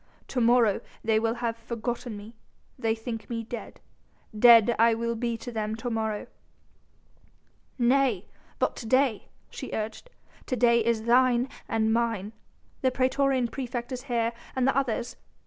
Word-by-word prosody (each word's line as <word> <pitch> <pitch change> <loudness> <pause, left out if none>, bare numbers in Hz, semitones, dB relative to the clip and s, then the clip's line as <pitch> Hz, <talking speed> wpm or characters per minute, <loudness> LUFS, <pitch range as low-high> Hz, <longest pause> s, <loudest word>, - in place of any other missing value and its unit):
To 250 - -1
morrow 230 -3 +4 0.2
they 220 -1 +3
will 225 +1 0
have 235 -1 -2
forgotten 235 0 -5
me... 210 +3 -11 0.4
they 225 -3 0
will 225 0 -11
think 225 -3 -5
me 230 -1 -3
dead... 235 +1 -8 0.6
dead 230 0 +8
will 230 0 +3
I - - 0
be 235 0 -2
to 245 - -7
them 215 -1 -2
to 240 +2 -4
morrow." 220 -2 -2 1.5
"Nay! 245 -5 +2 0.3
but - - 0
to 230 - -7
day," 255 -3 +2 0.2
she - - -7
urged, 220 - -4 0.4
"to 255 - 0
day 235 -1 +4
is 230 -1 0
thine 245 +1 +4 0.2
and 220 0 +1
mine.... 225 -3 -1 0.5
The 260 - +3
praetorian 260 0 +1
praefect 245 0 -5
is 255 -1 -4
here 235 -3 0 0.2
and 260 0 +2
the 270 - +2
others... 245 -3 -1
235 Hz, 155 wpm, -27 LUFS, 225-250 Hz, 1.5 s, dead